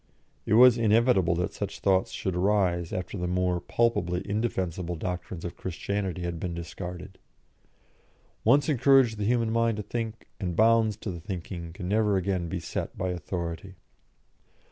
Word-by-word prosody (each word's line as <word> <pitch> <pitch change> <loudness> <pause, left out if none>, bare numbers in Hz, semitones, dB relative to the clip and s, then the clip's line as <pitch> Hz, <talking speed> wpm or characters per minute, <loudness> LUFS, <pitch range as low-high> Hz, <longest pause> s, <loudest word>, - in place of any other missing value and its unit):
It 105 - +3
was 125 0 +7
inevitable 110 -6 +3
that 90 +3 -2
such 100 -1 -5
thoughts 95 -1 +2
should 95 -2 -3
arise 90 -3 +1
after 90 +2 -4
the 90 - -1
more 90 0 0
palpably 90 -7 0
indefensible 95 -5 -2
doctrines 90 +1 -5
of 85 - -5
Christianity 95 0 -3
had 85 -1 -3
been 85 -1 -3
discarded. 90 +2 -7 1.2
Once 140 +6 +4
encourage 135 -4 +4
the 105 - -2
human 115 0 +1
mind 115 -1 +1
to 105 - -3
think, 115 +1 -4
and 90 -4 -3
bounds 110 +1 +4
to 100 - -5
the 85 - -6
thinking 85 -2 -6
can 90 +1 -7
never 105 0 +2
again 90 -2 -1
be 90 - -3
set 80 - -5
by 95 - -1
authority. 90 +1 -5
95 Hz, 155 wpm, -27 LUFS, 90-110 Hz, 1.2 s, was